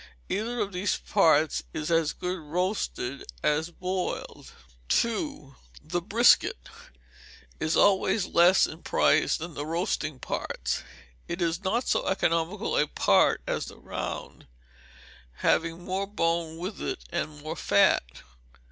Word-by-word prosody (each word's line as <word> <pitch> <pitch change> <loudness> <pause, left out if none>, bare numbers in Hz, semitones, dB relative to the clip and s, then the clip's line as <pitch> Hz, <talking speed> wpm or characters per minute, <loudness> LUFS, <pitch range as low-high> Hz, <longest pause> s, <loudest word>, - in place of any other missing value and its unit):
Either 230 +4 -2
of 205 -2 -2
these 185 +3 0
parts 160 -6 +3
is 155 +1 -3
as 165 -2 +3
good 180 +1 -4
roasted 165 - -2 0.2
as 155 +3 +1
boiled. 185 +1 -4 0.5
ii. 230 - -4 0.3
The 175 - -3
Brisket 220 - +4 1.0
is 155 - 0
always 195 0 +3
less 175 +3 +5
in 160 - -8
price - - +3
than 165 +1 -7
the 145 - -4
roasting 160 -2 -2
parts. - - -3 0.5
It 170 - -4
is 170 +1 -1
not 230 +6 0
so - - +1
economical 175 +2 0
a 150 - +3
part - - +3
as - - -2
the - - -11
round, - - -6 0.9
having 165 - 0
more 195 +1 -2
bone 165 -4 -1
with 185 +5 -6
it, - - -4
and 150 -1 -3
more 155 +1 -4
fat. 65 - +2
170 Hz, 130 wpm, -27 LUFS, 155-195 Hz, 1.0 s, less